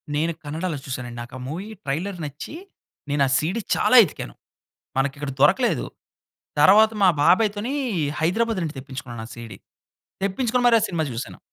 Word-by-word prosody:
నేను 160 Hz, +3 st, +1 dB
కన్నడలో 160 Hz, +2 st, -3 dB
చూసాను 130 Hz, -2 st, -5 dB
అండి. 120 Hz, 0 st, -8 dB
నాకు 120 Hz, +1 st, -10 dB
ఆ -, -, -8 dB
మూవీ 180 Hz, +7 st, -5 dB, 0.2 s
ట్రైలర్ 175 Hz, +8 st, -2 dB
నచ్చి, 145 Hz, -, -8 dB, 0.5 s
నేను 145 Hz, 0 st, +2 dB
ఆ -, -, -2 dB
సీడీ 180 Hz, +9 st, -1 dB
చాలా -, -, +3 dB
ఎతికాను. -, -, -8 dB, 0.6 s
మనకిక్కడ 140 Hz, +1 st, -1 dB
దొరకలేదు. 140 Hz, -, +3 dB, 0.8 s
తర్వాత 210 Hz, +7 st, +7 dB
మా 190 Hz, -, +7 dB
బాబాయ్‌తోని 210 Hz, -, +2 dB, 0.5 s
హైదరాబాద్ 220 Hz, +6 st, +1 dB
నుండి 155 Hz, -4 st, -5 dB
తెప్పించుకున్నాను 130 Hz, -3 st, -8 dB
ఆ -, -, -15 dB
సీడీ. 115 Hz, -2 st, -9 dB, 0.7 s
తెప్పించుకొని 245 Hz, +5 st, 0 dB
మరీ 235 Hz, -1 st, +6 dB
ఆ -, -, 0 dB
సినిమా 170 Hz, -3 st, -1 dB
చూశాను. 115 Hz, +1 st, -6 dB
160 Hz, 150 wpm, -23 LUFS, 135-200 Hz, 0.8 s, తర్వాత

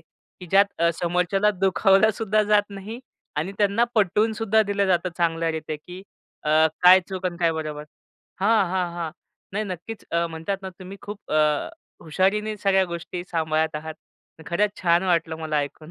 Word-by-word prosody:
की 180 Hz, -, -17 dB
ज्यात 195 Hz, -1 st, +2 dB, 0.2 s
समोरच्याला 180 Hz, +4 st, +1 dB
दुखावलासुद्धा 210 Hz, +2 st, +3 dB
जात 210 Hz, 0 st, +3 dB
नाही 200 Hz, +4 st, -7 dB, 0.4 s
आणि 160 Hz, +6 st, -2 dB
त्यांना 205 Hz, +3 st, +3 dB
पटवूनसुद्धा 220 Hz, +2 st, +2 dB
दिलं 200 Hz, -1 st, 0 dB
जातं 180 Hz, 0 st, +1 dB
चांगल्या 165 Hz, -1 st, +1 dB
रीतीने 155 Hz, -1 st, -4 dB
की 180 Hz, +5 st, -11 dB, 0.4 s
अ, 155 Hz, +1 st, +4 dB, 0.2 s
काय 185 Hz, +1 st, +8 dB
चूक 190 Hz, -1 st, -3 dB
आणि 175 Hz, -1 st, -4 dB
काय 165 Hz, -1 st, +3 dB
बरोबर. 155 Hz, -2 st, -5 dB, 0.6 s
हां, 215 Hz, +1 st, +4 dB
हां, 180 Hz, -2 st, -1 dB
हां. 170 Hz, -2 st, -4 dB, 0.4 s
नाही 210 Hz, +2 st, -1 dB
नक्कीच 200 Hz, +3 st, -7 dB
अ, 170 Hz, 0 st, +1 dB
म्हणतात 165 Hz, +4 st, -4 dB
ना 190 Hz, -, -5 dB
तुम्ही 190 Hz, +1 st, -9 dB
अ, -, -, -16 dB
खूप 205 Hz, 0 st, -6 dB, 0.9 s
हुशारीने 200 Hz, +6 st, 0 dB
सगळ्या 195 Hz, -2 st, +2 dB
गोष्टी 175 Hz, 0 st, -6 dB
सांभाळत 160 Hz, -1 st, 0 dB
आहात. 160 Hz, +1 st, -6 dB, 0.5 s
खरंच 205 Hz, +4 st, -1 dB
छान 170 Hz, 0 st, +3 dB
वाटलं 165 Hz, -3 st, 0 dB
मला 155 Hz, -1 st, -2 dB
ऐकून. 150 Hz, +2 st, -5 dB
185 Hz, 155 wpm, -24 LUFS, 165-200 Hz, 0.9 s, काय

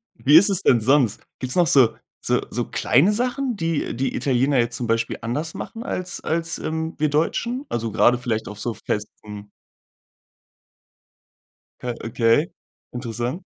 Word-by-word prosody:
Wie 145 Hz, +3 st, +3 dB
ist 195 Hz, +5 st, +8 dB
es 195 Hz, -, +1 dB
denn 120 Hz, -4 st, +4 dB
sonst? 130 Hz, -3 st, +2 dB, 0.2 s
Gibt 130 Hz, -1 st, -4 dB
es -, -, 0 dB
noch 175 Hz, -2 st, +4 dB
so 130 Hz, -6 st, +5 dB, 0.3 s
so -, -, +1 dB
so -, -, -2 dB
kleine 175 Hz, +12 st, +3 dB
Sachen, 250 Hz, +1 st, -1 dB
die 165 Hz, -8 st, -2 dB
die 135 Hz, +2 st, -1 dB
Italiener 135 Hz, +1 st, +1 dB
jetzt 120 Hz, 0 st, +1 dB
zum 120 Hz, -1 st, -3 dB
Beispiel 115 Hz, 0 st, 0 dB
anders 135 Hz, +8 st, -3 dB
machen 230 Hz, +1 st, -7 dB
als 185 Hz, 0 st, -4 dB
als, 165 Hz, 0 st, -2 dB
ähm, 160 Hz, +1 st, -3 dB
wir 150 Hz, 0 st, +1 dB
Deutschen? 235 Hz, -, -1 dB
Also, 115 Hz, -2 st, -2 dB
gerade 120 Hz, +2 st, +4 dB
vielleicht 115 Hz, -4 st, -3 dB
auf 105 Hz, 0 st, -10 dB
so 120 Hz, 0 st, -2 dB
Festen. 105 Hz, -1 st, -6 dB, 2.3 s
Okay, 120 Hz, -, 0 dB, 0.4 s
interessant. 120 Hz, -, -4 dB
135 Hz, 150 wpm, -22 LUFS, 115-165 Hz, 2.3 s, ist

